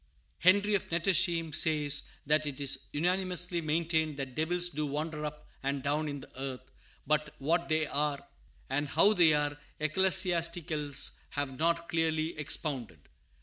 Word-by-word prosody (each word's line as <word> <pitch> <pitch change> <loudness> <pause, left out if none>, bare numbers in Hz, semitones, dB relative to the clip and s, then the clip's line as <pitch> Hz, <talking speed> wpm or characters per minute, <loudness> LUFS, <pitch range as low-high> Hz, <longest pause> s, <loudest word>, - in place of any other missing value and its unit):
Henry 205 +4 +4
of 200 - 0
Nettesheim 170 -2 +1
says 150 -2 +2 0.2
"that 150 +1 +2
it 140 -1 -5
is 140 -2 -1
unanimously 180 +1 +1
maintained 160 -1 0
that 135 -2 -5
devils 175 +4 +1
do 150 -2 -3
wander 150 +2 -3
up 150 0 -6
and 140 0 -2
down 150 +2 0
in 145 -1 -5
the 130 - -11
earth; 130 -1 -6 0.3
but 150 0 0
what 170 +5 0
they 155 0 +2
are, 145 -1 -1 0.5
or 140 +2 +1
how 165 +9 +4
they 165 -6 +6
are, 145 0 0 0.2
ecclesiasticals 170 -3 +1
have 140 -3 -4
not 170 +1 +1
clearly 160 -1 0
expounded." 135 - -3
155 Hz, 145 wpm, -30 LUFS, 145-170 Hz, 0.5 s, they